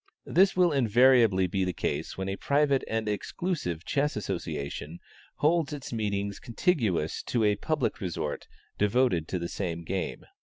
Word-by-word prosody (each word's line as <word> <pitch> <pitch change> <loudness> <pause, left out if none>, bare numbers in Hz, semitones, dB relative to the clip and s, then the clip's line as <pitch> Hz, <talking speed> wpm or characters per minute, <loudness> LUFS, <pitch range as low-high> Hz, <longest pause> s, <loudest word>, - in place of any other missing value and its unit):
This 190 +2 +4
will 180 -2 +4
invariably 120 -6 +4
be 95 +2 -1
the 90 -1 -1
case - - -3
when 95 0 -3
a 95 - -2
private 140 +3 +2
and 110 -1 -2
exclusive 105 - -3
chess 145 +1 0
association 75 -5 -4 0.4
holds 155 -1 +2
its 140 -4 -6
meetings 100 -2 -2
contiguous 115 - 0
to 120 -3 +1
a 105 -1 +3
public 150 -1 -1
resort 85 -5 -3 0.3
devoted 105 -6 +2
to 95 - -2
the 85 -1 -3
same 85 -3 -4
game. 95 +2 -4
105 Hz, 150 wpm, -28 LUFS, 95-140 Hz, 0.4 s, This